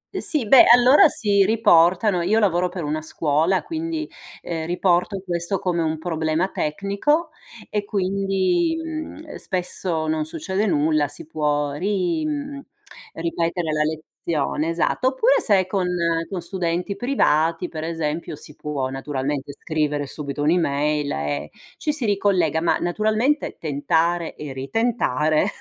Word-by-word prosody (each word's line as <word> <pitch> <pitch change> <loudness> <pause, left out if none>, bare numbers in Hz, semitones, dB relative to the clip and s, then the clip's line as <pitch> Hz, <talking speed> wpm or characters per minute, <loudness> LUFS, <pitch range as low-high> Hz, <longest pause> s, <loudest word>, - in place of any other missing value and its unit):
E - - -2
sì, 290 -8 +1
beh, 265 +2 +8
allora 250 +6 +7
si 200 -7 +2
riportano 190 -3 +4
io 200 +6 +2
lavoro 180 -4 +2
per 180 -1 -5
una 155 +1 -2
scuola, 160 +4 +1
quindi, 325 -1 -4 0.4
ehm, 160 -2 -4
riporto 180 +2 +1
questo 175 +1 -1
come 175 -2 -1
un 160 -1 -1
problema 160 +2 -1
tecnico 200 - -1 0.4
e 210 -1 -2
quindi, 200 - 0
mhmm, 315 -1 -5
ehm, - - -9
spesso 180 -3 -2
non 155 0 0
succede 175 +6 -2
nulla, 155 -3 +2
si 145 - -7
può 150 -2 -1
ri 195 - -1
mhmm, 285 -1 -4 0.5
ripetere 165 0 -2
la 155 0 0
lezione, 155 0 -2
esatto. 170 +9 0
Oppure 460 - +3
se 195 -4 +3
con 185 -1 -1 0.4
con 185 -3 -4
studenti 180 +1 -2
privati, 170 - +1
per 155 -2 -6
esempio, 160 -1 -3
si 150 - -11
può 140 -3 -3
naturalmente 135 +1 -3
scrivere 150 -1 -2
subito 145 0 -5
un'email 150 -2 +1
e 70 0 -3 0.3
ci 300 - -1
si 285 -5 -2
ricollega. 190 -6 +1
Ma 170 - +2
naturalmente 220 - 0
tentare 165 +3 0
e 150 -3 -7
ritentare 155 - 0
175 Hz, 135 wpm, -22 LUFS, 155-205 Hz, 0.5 s, beh